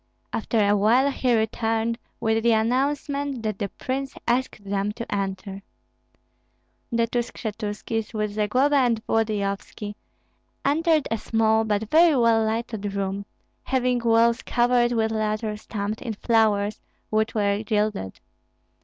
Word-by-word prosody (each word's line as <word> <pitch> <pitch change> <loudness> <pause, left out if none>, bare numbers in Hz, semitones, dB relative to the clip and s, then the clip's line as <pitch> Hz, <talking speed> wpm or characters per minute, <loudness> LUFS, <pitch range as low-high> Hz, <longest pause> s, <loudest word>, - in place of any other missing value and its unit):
After 225 +1 -1
a 205 - +4
while 240 +7 +4
he 250 -3 +1
returned 225 +1 0 0.2
with 220 0 +1
the 235 0 +4
announcement 275 +3 0
that 215 -2 -2
the 200 - -2
prince 270 +5 -4
asked 240 -3 0
them 200 +1 -1
to 235 +1 -6
enter. 195 0 -4 1.3
The 230 0 +2
two 240 +1 -1
Skshetuskis, 220 -1 -4
with 215 -2 -2
Zagloba 250 +8 +2
and 235 -4 +1
Volodyovski, 210 -1 -2 0.7
entered 315 +1 +2
a 225 - 0
small 220 0 +2
but 210 0 -1
very 330 -1 +6
well 230 -2 +4
lighted 220 -2 -2
room, 195 0 -3 0.3
having 250 -1 +1
walls 230 0 +3
covered 240 0 +2
with 220 -2 +1
leather 215 0 -1
stamped 210 0 -4
in 230 -3 -3
flowers, 215 -2 +1 0.3
which 220 +1 +1
were 200 -1 +1
gilded. 210 - -1
225 Hz, 130 wpm, -24 LUFS, 210-240 Hz, 1.3 s, very